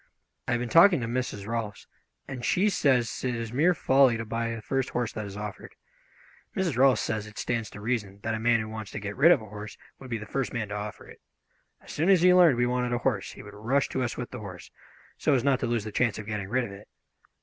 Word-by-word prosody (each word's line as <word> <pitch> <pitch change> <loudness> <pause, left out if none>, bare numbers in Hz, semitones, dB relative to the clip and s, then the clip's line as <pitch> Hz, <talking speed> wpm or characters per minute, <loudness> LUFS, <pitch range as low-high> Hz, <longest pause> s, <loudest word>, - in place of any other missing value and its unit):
I - - +1
have 120 - +1
been 125 - -3
talking 170 - +6
to - - -2
Mrs. 115 -4 -3
Rolfs, 115 -2 -4 0.4
and 130 -3 -6
she 185 - +2
says 130 - +1
it 125 -2 0
is 115 0 -5
mere 165 +7 +3
folly 130 -4 +4
to 115 - -4
buy 115 +1 -2
the - - -6
first 135 +2 -1
horse 120 -2 -2
that 110 -2 -5
is 100 0 -8
offered. 105 -1 -7 0.8
Mrs. 180 -7 0
Rolfs 130 -2 +4
says 110 -1 -2
it 105 - -13
stands 115 -3 -2
to - - -11
reason 105 -3 -3
that 115 - -1
a 110 - -2
man 115 0 +3
who 110 - -5
wants 110 -2 -6
to - - -4
get 100 0 -5
rid 160 +6 +6
of 115 - +4
a - - -9
horse 105 0 -9 0.2
would 130 - -11
be 115 - -1
the 110 - -8
first 135 +4 -3
man 110 -4 -3
to 105 - -4
offer 105 0 -6
it. - - -15 0.6
As - - -12
soon 165 +5 0
as 185 -3 +5
he 180 0 +7
learned 175 -8 +6
we 120 - +3
wanted 125 0 0
a - - +1
horse 115 -8 0
he - - -11
would 105 - -11
rush 125 +7 0
to 130 - -2
us 120 -2 -2
with 125 - -5
the 125 - -6
horse, 95 -4 -9 0.5
so 145 - +3
as 125 - +1
not 140 -2 +2
to - - -1
lose 115 -2 0
the 110 - -6
chance 115 -1 +1
of 110 - -7
getting 105 -2 -4
rid 125 +3 +1
of 110 - -6
it. 100 +2 -12
115 Hz, 265 wpm, -27 LUFS, 105-130 Hz, 0.8 s, he